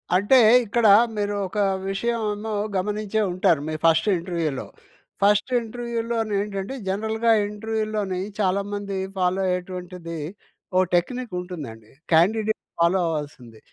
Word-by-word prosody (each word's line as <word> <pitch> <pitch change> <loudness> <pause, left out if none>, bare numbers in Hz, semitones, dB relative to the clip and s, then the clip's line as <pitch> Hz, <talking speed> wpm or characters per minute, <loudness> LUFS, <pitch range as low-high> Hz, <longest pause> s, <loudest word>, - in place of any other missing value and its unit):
అంటే 205 +8 +5 0.3
ఇక్కడ 225 +2 +2 0.3
మీరు 205 -1 -1
ఒక 210 +3 -4 0.3
విషయము 230 +3 -1
ఏమో 215 +2 -5 0.2
గమనించే 210 +2 -1
ఉంటారు 175 -4 +2
మీ - - -3
ఫస్ట్ 165 +3 +4
ఇంటర్వ్యూలో. 170 -5 -3 0.6
ఫస్ట్ 205 +4 +3
ఇంటర్వ్యూలోని 230 -1 -3
ఏంటంటే 200 +2 -4
జనరల్‌గా 220 +4 0 0.2
ఇంటర్వ్యూలోని 215 -2 -2 0.2
చాలామంది 200 0 -1 0.2
ఫాలో 185 +1 +1
అయ్యేటువంటిది 180 -2 -4 0.6
ఓ - - +5 0.2
టెక్నిక్ 235 +5 -1
ఉంటుందండి. 140 - -8 0.2
క్యాండిడేట్ 215 +7 +3 0.2
ఫాలో 170 +3 +3
అవ్వాల్సింది. 145 -8 -5
195 Hz, 110 wpm, -24 LUFS, 180-220 Hz, 0.6 s, అంటే